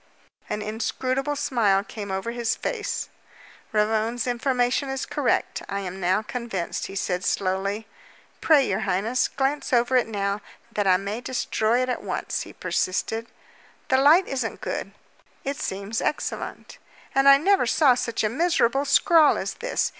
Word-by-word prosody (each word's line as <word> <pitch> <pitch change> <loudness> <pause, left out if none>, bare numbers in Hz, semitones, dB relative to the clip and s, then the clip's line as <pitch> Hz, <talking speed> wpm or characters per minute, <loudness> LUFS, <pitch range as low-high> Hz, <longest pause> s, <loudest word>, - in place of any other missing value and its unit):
An 210 - -2
inscrutable 255 +6 -2
smile 210 -8 +2
came 205 -1 -7
over 190 +4 -2
his 235 -1 -1
face. 445 -4 -3 0.6
"Ravone's 220 +2 +1
information 250 +2 0
is 270 0 -3
correct, - - 0
I 200 0 -2
am 190 0 -6
now 185 +4 +1
convinced," 230 -6 -4
he 195 - -9
said 180 -1 -1
slowly. 195 +3 -1 0.6
"Pray, 290 -5 +5
your 195 +1 0
highness, 215 +7 +1
glance 280 +2 -1
over 245 +1 +3
it 250 - +3
now, 200 -1 -2 0.3
that 205 -3 -1
I 185 -1 +5
may 200 +4 -4
destroy 245 -1 0
it - - -2
at 250 - -2
once," - - -3
he - - -8
persisted. 225 +5 -1 0.6
"The 260 - +4
light 305 +7 +6
isn't 255 -4 -3
good." - - -4 0.5
"It 275 0 -3
seems 200 +1 -3
excellent." 300 - -4 0.3
"And 270 +1 +5
I 275 - +9
never 375 -3 +3
saw 265 +1 +5
such 235 -2 -2
a - - +3
miserable 275 -1 +2
scrawl 310 +2 +5
as - - -3
this. - - -1
235 Hz, 155 wpm, -25 LUFS, 200-270 Hz, 0.6 s, I